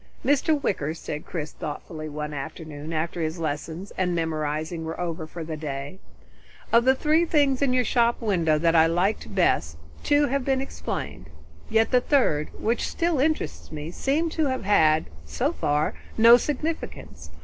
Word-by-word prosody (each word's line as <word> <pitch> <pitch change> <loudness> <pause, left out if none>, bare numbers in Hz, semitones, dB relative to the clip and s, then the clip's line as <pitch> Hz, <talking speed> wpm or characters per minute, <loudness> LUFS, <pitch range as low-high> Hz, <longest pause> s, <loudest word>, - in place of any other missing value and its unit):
"Mr. 290 +2 +3
Wicker," 190 - -1 0.4
Chris 155 -3 -5
said - - -28
thoughtfully 155 +1 -6
one 150 0 -5
afternoon 150 +1 -7
after 165 +2 -2
his 160 +2 -2
lessons 160 +4 -4
and 180 -2 +1
memorizing 160 0 -2
were 160 0 -5
over 165 -2 -3
for 165 +1 -7
the 160 0 -5
day, 145 +3 -5 0.7
"of 235 +1 +5
the 260 0 +5
three 310 +4 +3
things 290 -5 +2
in 275 -2 +3
your 255 0 +3
shop 235 0 +2
window 170 -9 +2
that 165 +1 +2
I 160 0 +6
liked 190 +4 0
best, 80 - +2 0.3
two 290 0 +4
have 275 0 -1
been 265 0 +1
explained. 75 - -5 0.4
Yet 225 0 +2
the 250 - +4
third, 200 - +2
which 230 +2 0
still 335 -4 0
interests 310 +3 -1
me, 155 +1 -6
seems 310 - 0
to 315 -2 +2
have 260 -1 -2
had, 160 -6 +4 0.2
so 80 0 -1
far, 145 - 0 0.2
no 230 +1 +9
significance. 300 +5 -4
175 Hz, 165 wpm, -25 LUFS, 155-260 Hz, 0.7 s, no